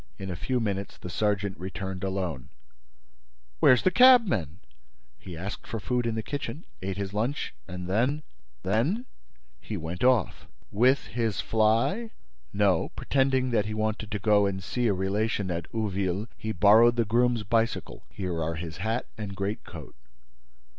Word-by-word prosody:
In 95 -1 -5
a - - -4
few 125 +9 -1
minutes, 100 -3 -3
the 90 - -8
sergeant 100 -1 -1
returned 95 0 -5
alone. 95 -9 -3 1.1
"Where's 125 - +6
the 185 - +4
cabman?" 210 - +5 0.6
"He 90 -4 -9
asked 100 +5 -6
for 115 - -4
food 120 +3 -1
in 115 - -1
the 110 - -2
kitchen, 145 +1 -5 0.2
ate 95 0 -3
his 100 -1 -4
lunch 115 +7 -2
and 90 -1 -6
then—" 110 +7 +2
"And 150 +2 -4 0.4
then—?" 140 - +1 0.5
"He 105 - -5
went 85 +3 -5
off." 125 -6 +2 0.2
"With 130 +6 +3
his 115 -3 -2
fly?" 115 - +1 0.4
"No. 100 -4 +2
Pretending 130 -2 +1
that 105 -3 +1
he 110 - -3
wanted 110 0 -2
to 105 - -2
go 105 0 +3
and 95 -1 -3
see 120 +5 -1
a 105 - +3
relation 100 +1 -1
at 85 -2 -4
Ouville, 100 -2 -1
he 110 - -4
borrowed 110 +5 +6
the 115 -1 +2
groom's 120 +1 +2
bicycle. 115 +2 -1
Here 90 -4 -4
are 80 +1 -1
his 80 0 -6
hat 110 +6 -1
and 100 -2 -5
greatcoat." 100 +2 -5
105 Hz, 160 wpm, -27 LUFS, 95-120 Hz, 1.1 s, Where's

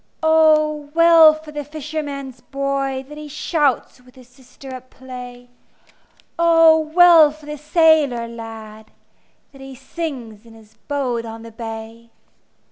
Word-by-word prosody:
O 305 -2 +2
well 335 -1 +7
for 310 0 -12
the 295 -1 -6
fisherman's 285 -3 -7
boy, 275 -1 -3
That 300 +1 -11
he 300 - -9
shouts 295 -3 -2
with 250 +1 -22
his 255 -2 -17
sister 260 +1 -14
at 255 0 -11
play! 250 -1 -11 0.9
O 330 -1 +5
well 320 0 +5
for 305 0 -15
the 300 0 -7
sailor 300 -6 +2
lad, 220 -2 -11 0.6
That 275 -2 -16
he 270 0 -11
sings 260 -6 -7
in 230 -1 -17
his 220 -1 -19
boat 260 -5 -2
on 225 0 -9
the 230 - -11
bay! 225 0 -9
275 Hz, 135 wpm, -19 LUFS, 245-310 Hz, 0.9 s, well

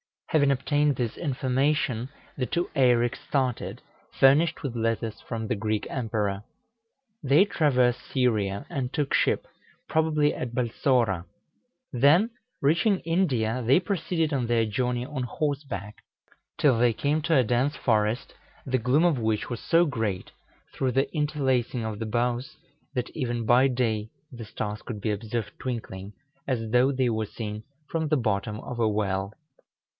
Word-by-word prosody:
Having 145 -3 +3
obtained 145 +2 +1
this 120 -3 -2
information, 135 -3 0 0.3
the 130 - 0
two 170 +9 -1
Eireks 120 -3 +3
started, 130 -4 -1 0.4
furnished 150 +5 +4
with 130 -4 -3
letters 115 -1 -1
from 110 -1 -5
the 120 - 0
Greek 110 0 -1
Emperor. 105 -5 -2 0.8
They 145 +7 +5
traversed 125 -9 +2
Syria, 105 -7 +1
and 135 -6 -3
took 145 -3 -1
ship - - +2 0.4
probably 155 -2 +2
at 120 -1 -5
Balsora; 120 - +1 0.7
then, 155 - +4 0.3
reaching 170 +8 +3
India, 130 -10 0
they 130 +8 +5
proceeded 175 -5 -1
on 125 -4 0
their 115 -1 +2
journey 125 +2 -1
on 140 -2 -4
horseback, 130 - -3 0.6
till 130 -6 +3
they 120 -1 +4
came 145 +7 0
to 165 0 +2
a 130 - +5
dense 125 +5 +1
forest, 110 +2 0 0.3
the 130 -1 0
gloom 125 +8 +3
of 170 -7 +3
which 110 -2 -1
was 120 -2 -4
so 170 +1 +3
great, 110 - -2 0.4
through 130 -2 -1
the 135 +1 +1
interlacing 135 -6 0
of 110 -2 -4
the 115 - -3
boughs, 120 +3 -1 0.4
that 125 -1 -1
even 120 -5 -2
by 125 +4 +5
day 115 -4 -1 0.2
the 120 -3 -8
stars 105 0 -5
could 110 -4 -6
be 110 - 0
observed 110 0 -3
twinkling, 105 -5 -5 0.3
as 115 -5 -2
though 125 +3 +4
they 130 -2 +1
were 110 -1 -1
seen 105 0 -6 0.3
from 160 -1 -1
the 155 0 +2
bottom 105 -3 -1
of 125 - -7
a 115 - +3
well. 100 -2 -1
125 Hz, 150 wpm, -26 LUFS, 110-140 Hz, 0.8 s, They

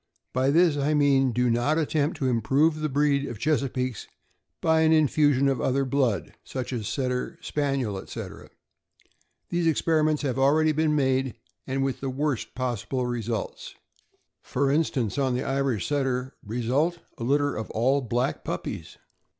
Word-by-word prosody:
By 130 +2 +2
this 165 0 +4
I 145 +2 +1
mean 135 -3 +3
do 125 +2 +1
not 120 +7 +1
attempt 155 0 0
to 135 -4 -1
improve 135 +7 +2
the 155 0 -1
breed 140 0 +1
of 120 - -6
Chesapeakes 130 -3 -1 0.5
by 160 0 +3
an 160 0 +4
infusion 145 -3 +3
of 135 -3 0
other 135 +1 +1
blood, 125 - 0
such 130 0 -5
as 110 -4 -3
Setter, 125 +1 -2
Spaniel, 135 -9 -1
etc. - - -8 1.0
Those 175 -1 +1
experiments 155 -1 +2
have 135 -2 -1
already 155 +4 +4
been 155 0 +1
made, 130 -2 +1 0.3
and 135 0 -1
with 135 -1 -2
the 135 - -2
worst 135 -3 -2
possible 125 0 -2
results. 115 -3 -4 0.7
For 135 +1 0
instance, 140 -6 0
on 130 -2 +1
the 125 - -1
Irish 135 -5 0
Setter; 135 -3 -1
result, 125 +10 0 0.2
a - - -4
litter 145 +3 +1
of 110 - -5
all 130 +5 +2
black 125 +1 -1
puppies. - - -5
135 Hz, 150 wpm, -26 LUFS, 125-150 Hz, 1.0 s, this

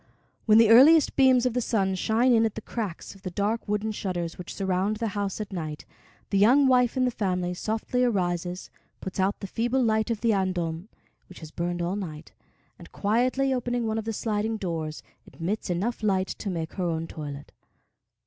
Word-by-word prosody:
When 215 0 +7
the 225 -1 +6
earliest 290 +6 +7
beams 260 -2 +5
of 250 - +1
the 250 - 0
sun 195 -5 0
shine 225 +6 +2
in 225 -1 +4
at 220 -2 -1
the 220 - -5
cracks 210 -6 -5
of 195 - -18
the 185 - -5
dark 205 +6 -2
wooden 210 +1 -1
shutters 175 -5 -3
which 180 - -8
surround 195 +2 0
the 225 0 -2
house 200 -1 -3
at 210 -2 -6
night, 155 -4 -5 0.5
the 200 - +2
young 255 +8 +5
wife 250 -1 +3
in 255 - +3
the 250 - +1
family 180 -5 -1
softly 220 +6 -1
arises, 180 -5 -1 0.3
puts 190 +1 -6
out 190 +2 +1
the - - -4
feeble 240 +6 0
light 220 0 +1
of 225 -3 -2
the 230 -1 +3
andon, 180 -2 -2 0.4
which 185 - -13
has 155 -1 -9
burned 175 +1 -3
all 175 +3 -1
night, 165 -6 -7 0.5
and, - - -13
quietly 255 +6 +1
opening 245 -1 -1
one 220 0 -1
of 220 - -6
the 225 - -2
sliding 220 0 -2
doors, 165 -6 -4 0.2
admits 185 +6 -4
enough 200 +8 -2
light 190 -3 +1
to 205 - -5
make 165 -3 -4
her 185 - -2
own 165 -1 -1
toilet. 145 -3 -8
205 Hz, 195 wpm, -26 LUFS, 180-230 Hz, 0.5 s, When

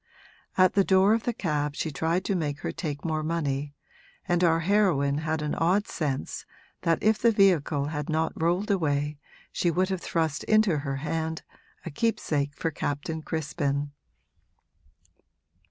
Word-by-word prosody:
At 185 -1 +5
the 200 - +4
door 190 +2 +4
of 225 0 0
the 240 - +1
cab 150 -7 -1
she 160 - -2
tried 165 +6 -1
to 200 - 0
make 150 -4 -2
her - - -2
take 145 -4 -5
more 155 -1 0
money, 145 -3 -2 0.5
and 175 -1 +2
our 165 -1 +4
heroine 160 -7 +2
had 155 0 -2
an 150 - -1
odd 185 +6 +2
sense 140 -4 -3 0.4
that 165 -1 +1
if 215 0 +3
the 235 - +4
vehicle 170 -9 +3
had 150 -1 -4
not 160 +1 0
rolled 175 +6 0
away 150 -5 0 0.3
she 175 - +1
would 185 +3 +1
have 190 -2 -2
thrust 160 -4 -1
into 215 -8 +3
her 140 -1 -3
hand 160 +3 -3 0.4
a - - -5
keepsake 145 -8 -1
for 165 - -2
Captain 145 +2 -3
Crispin. 145 -2 -2
160 Hz, 155 wpm, -27 LUFS, 145-185 Hz, 0.5 s, At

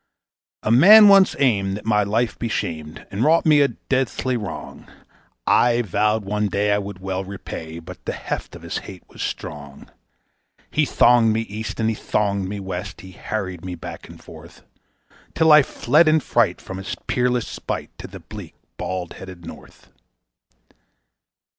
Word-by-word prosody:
A 110 - 0
man 205 - +9
once 195 -1 +6
aimed 100 -7 +1
that 105 - -11
my 105 -2 +3
life 110 +2 -1
be 115 - -2
shamed, 80 -6 -4
and 100 +4 -1
wrought 160 +4 +3
me 150 -2 +5
a 140 - +5
deathly 130 -2 -2
wrong; 105 -7 -7 0.6
I 120 0 +3
vowed 105 +1 0
one 105 +1 -1
day 100 +1 0
I 100 - +2
would 100 -1 -7
well 95 0 -3
repay, 90 -4 -8
but 80 - -11
the - - -2
heft - - -5
of - - -12
his - - -4
hate 95 -2 -11
was - - -11
strong. 70 -2 -7 0.8
He - - +1
thonged 120 -2 +4
me 110 - 0
East 110 +1 -6
and 110 - +1
he 110 - +1
thonged 100 -3 -1
me 100 +1 -5
West; 95 -2 -6
he 95 - -12
harried 95 -2 -5
me 90 -1 -5
back 85 - -9
and - - -13
forth, - - -14 0.7
Till 160 -1 +4
I 150 0 +9
fled 150 +4 +2
in 155 0 +4
fright - - +1
from 95 0 -8
his 95 - -5
peerless 125 -1 0
spite - - -6
to - - -7
the - - -11
bleak, - - -10 0.2
bald 90 -2 -4
headed 90 -3 -11
North. - - -13
105 Hz, 170 wpm, -21 LUFS, 95-120 Hz, 0.8 s, man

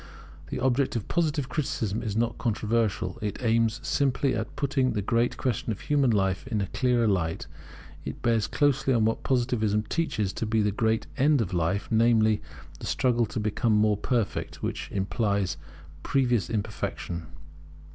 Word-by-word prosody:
The - - -3
object 130 +1 +1
of 115 - -3
Positive 155 -5 0
criticism 120 - -2
is 105 -3 -3
not 120 +1 0
controversial. 110 -5 0
It 105 -1 -2
aims 115 0 +2
simply 135 -1 +1
at 110 0 -4
putting 135 -2 +1
the 105 - -1
great 115 +4 +1
question 125 0 -1
of 100 - -4
human 140 -3 +2
life 95 -4 +1
in 110 - -1
a 100 - 0
clearer 120 +2 +1
light. 85 -5 0 0.6
It - - -7
bears 115 -3 +2
closely 135 -2 +2
on 110 -2 +3
what 115 - 0
Positivism 120 -5 +1
teaches 110 - -1
to 115 - -3
be 110 0 +2
the 105 - +2
great 110 +2 0
end 145 +1 +4
of 100 -5 -1
life, 90 +4 0
namely, 110 -1 +4 0.4
the - - -6
struggle 120 -3 +2
to 110 - -4
become 110 +2 +1
more 105 0 +4
perfect; 115 +1 -2
which - - -3
implies 100 0 0 0.5
previous 125 - +1
imperfection. 100 -6 -3
115 Hz, 160 wpm, -27 LUFS, 105-125 Hz, 0.6 s, end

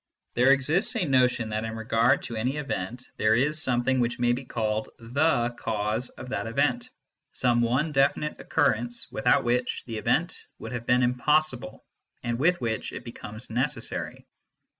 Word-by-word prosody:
There 125 +2 +4
exists 150 - +3
a 205 -6 +1
notion 125 -5 +2
that 110 +1 -2
in 110 0 -4
regard 115 +2 +2
to 120 - -5
any 125 +6 -1
event 125 -4 -4
there 110 +1 +3
is 150 +6 +1
something 130 0 +1
which 120 0 0
may 120 0 +2
be 125 +2 -2
called 110 -3 -2
the 120 +1 +1
cause 110 +1 -2
of 125 - -10
that 120 - -2
event 145 - 0 0.4
some 120 -2 +2
one 130 +7 +1
definite 140 +2 +1
occurrence, 120 -5 0
without 125 -2 +3
which 125 +1 0
the 115 -3 -4
event - - +1 0.2
would - - -8
have 120 -1 -5
been 125 0 +4
impossible 125 -2 +1 0.4
and 120 0 -2
with 175 +5 +3
which 115 -3 -2
it - - -6
be 120 - -7
comes 110 +1 -9
necessary. 125 0 -2
125 Hz, 165 wpm, -27 LUFS, 115-135 Hz, 0.4 s, There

